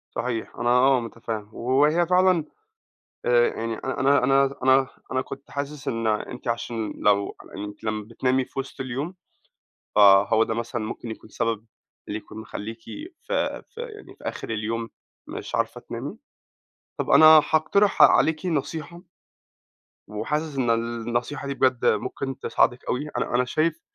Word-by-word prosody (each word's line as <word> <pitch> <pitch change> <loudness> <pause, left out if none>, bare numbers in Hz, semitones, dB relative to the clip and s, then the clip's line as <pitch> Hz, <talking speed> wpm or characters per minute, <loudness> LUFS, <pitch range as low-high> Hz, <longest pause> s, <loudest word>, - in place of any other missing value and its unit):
صحيح 115 -2 -3
أنا 120 - 0
آه 130 +1 +5
متفهم 115 -2 -6
وهي 145 +9 +2
فعلًا 180 -2 +4 0.8
آآ 120 -1 +5
يعني 115 0 -3
أنا 135 +3 +1
أنا 135 +1 +3
أنا 130 0 +5 0.2
أنا 130 - +1
كُنت 135 +1 -10
حاسس 140 0 -5
إن 115 -1 -1
أنتِ 110 +4 -2
عشان 115 -1 -2
لو 100 -1 +1
على - - -17
إنِّك 105 +1 -7
لمّا 110 -1 -2
بتنامي 130 +3 0
في - - -7
وسط 135 0 -6
اليوم 135 +7 -4 0.8
فَهو 100 +2 +6
ده 110 - -2
مثلًا 115 0 -3
ممكن 115 +1 -6
يكون 110 0 -9
سبب، 115 -2 -2 0.4
اللي 105 - -3
يكون 110 - -12
مخلّيكِ 110 +1 -7
في 300 - -8 0.6
في 465 - -11
يعني 435 -3 -9
في - - -18
آخر - - -5
اليوم 115 +1 -3 0.4
مش - - -7
عارفة - - -1
تنامي؟ 135 - -6 0.8
طب - - -3
أنا 160 - +8 0.3
هاقترح 200 +6 +3
عليكِ 160 +3 +5
نصيحة 160 +1 -3 1.1
وحاسس 150 +8 -3
إن 125 -3 +1
النصيحة 120 +4 -2
دي 140 - -2
بجد 130 -3 +2
ممكن 130 +5 -1
تساعدِك 125 - +1
أوي 145 +5 -1
أنا - - -2
أنا 125 +1 +3
شايف 155 +5 0
125 Hz, 150 wpm, -25 LUFS, 115-140 Hz, 1.1 s, أنا